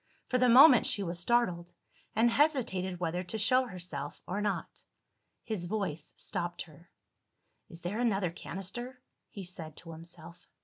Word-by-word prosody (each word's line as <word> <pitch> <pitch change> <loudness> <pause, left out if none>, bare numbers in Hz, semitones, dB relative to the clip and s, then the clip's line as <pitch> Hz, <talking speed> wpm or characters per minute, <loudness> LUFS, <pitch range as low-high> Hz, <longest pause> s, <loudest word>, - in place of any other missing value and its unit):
For 250 - +2
the 250 0 +4
moment 255 +1 +8
she 200 - 0
was 170 -1 -3
startled, 180 -5 +1 0.4
and 230 +2 +4
hesitated 225 - +1
whether 175 0 -1
to 200 +5 -4
show 255 +4 +3
herself 170 -8 -6
or 200 +3 -3
not. 205 -1 -3 0.6
His 210 -6 -3
voice 180 -6 -3
stopped 175 -3 -3
her. 165 +2 -18 0.8
"Is 170 0 -8
there 195 +6 -2
another 200 -7 +1
canister?" 195 +9 -5 0.3
he 200 - -8
said 165 -4 -7
to 165 - -9
himself. 170 +1 -11
185 Hz, 145 wpm, -31 LUFS, 170-230 Hz, 0.8 s, moment